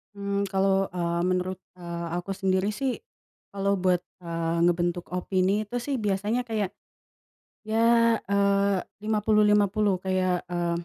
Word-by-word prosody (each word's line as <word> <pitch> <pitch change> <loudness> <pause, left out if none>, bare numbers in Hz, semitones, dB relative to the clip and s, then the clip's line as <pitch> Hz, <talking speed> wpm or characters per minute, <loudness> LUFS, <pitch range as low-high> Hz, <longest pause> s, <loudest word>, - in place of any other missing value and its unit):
Mmm, 200 0 -1
kalau, 195 0 +2
eee, 170 -1 -1
menurut, 185 +1 -1 0.2
eee, 170 -1 -5
aku 175 +3 -6
sendiri 190 0 +1
sih 265 -1 -2 0.5
kalau 200 0 0
buat, 180 -1 +2 0.2
eee, 170 -1 -2
ngebentuk 175 0 0
opini 190 +3 +1
itu 215 +3 -8
sih 275 +3 -2
biasanya 210 +2 0
kayak, 215 -4 -3 0.9
ya, 220 - 0 0.5
eee, 200 -1 +2 0.2
50:50 210 -2 +2
kayak, 185 -1 0
eee 170 -1 -2
195 Hz, 120 wpm, -26 LUFS, 180-205 Hz, 0.9 s, kalau